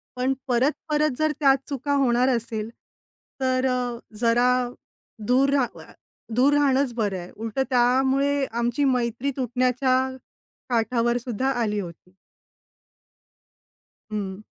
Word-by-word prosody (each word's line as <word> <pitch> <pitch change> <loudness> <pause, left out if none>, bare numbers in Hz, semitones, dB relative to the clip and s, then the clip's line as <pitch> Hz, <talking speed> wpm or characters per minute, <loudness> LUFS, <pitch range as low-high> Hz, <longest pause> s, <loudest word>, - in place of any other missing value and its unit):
पण 255 +1 +1
परत-परत 300 +4 +1
जर 310 0 +1
त्याच 275 -2 +4
चुका 285 0 -2
होणार 250 -1 +3
असेल, 225 -3 -2 0.7
तर 260 0 +1 0.5
जरा 240 +1 +3 0.8
दूर 265 +3 +4
राह 265 -4 0
अ, - - -15 0.4
दूर 265 +4 +4
राहणंच 275 -3 +2
बरं 210 -5 -1
आहे. 175 0 -9
उलटं 225 +4 -2
त्यामुळे 265 +3 +2
आमची 235 +4 0
मैत्री 250 +1 0
तुटण्याच्या 255 +1 +1 0.7
काठावरसुद्धा 240 +1 0
आली 210 -2 0
होती. 180 -1 -9 2.0
हं. 205 -1 -5
250 Hz, 105 wpm, -24 LUFS, 235-270 Hz, 2.0 s, त्याच